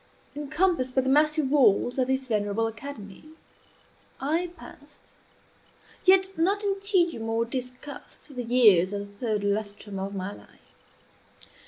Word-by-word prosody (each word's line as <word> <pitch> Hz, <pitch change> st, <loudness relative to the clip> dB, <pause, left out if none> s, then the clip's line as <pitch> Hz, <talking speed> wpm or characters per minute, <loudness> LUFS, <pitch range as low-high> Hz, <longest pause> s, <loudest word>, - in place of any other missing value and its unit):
Encompassed 295 Hz, -2 st, 0 dB
by 265 Hz, -, +4 dB
the 260 Hz, -, -1 dB
massy 305 Hz, +2 st, +3 dB
walls 260 Hz, -3 st, +3 dB
of 255 Hz, -, +2 dB
this 265 Hz, 0 st, 0 dB
venerable 210 Hz, -1 st, 0 dB
academy, 225 Hz, -3 st, -8 dB, 1.0 s
I 320 Hz, +6 st, 0 dB
passed, -, -, -16 dB, 0.9 s
yet 380 Hz, +1 st, +4 dB
not 390 Hz, +6 st, +1 dB
in 395 Hz, -1 st, 0 dB
tedium 350 Hz, -, +1 dB
or 225 Hz, +1 st, +1 dB
disgust, 255 Hz, +3 st, -8 dB
the 250 Hz, -, -3 dB
years 215 Hz, -7 st, +4 dB
of 205 Hz, 0 st, -3 dB
the 200 Hz, -, -18 dB
third 210 Hz, -2 st, 0 dB
lustrum 205 Hz, -1 st, -3 dB
of 195 Hz, +1 st, -4 dB
my 190 Hz, +1 st, -4 dB
life. -, -, -17 dB
255 Hz, 135 wpm, -26 LUFS, 210-305 Hz, 1.0 s, by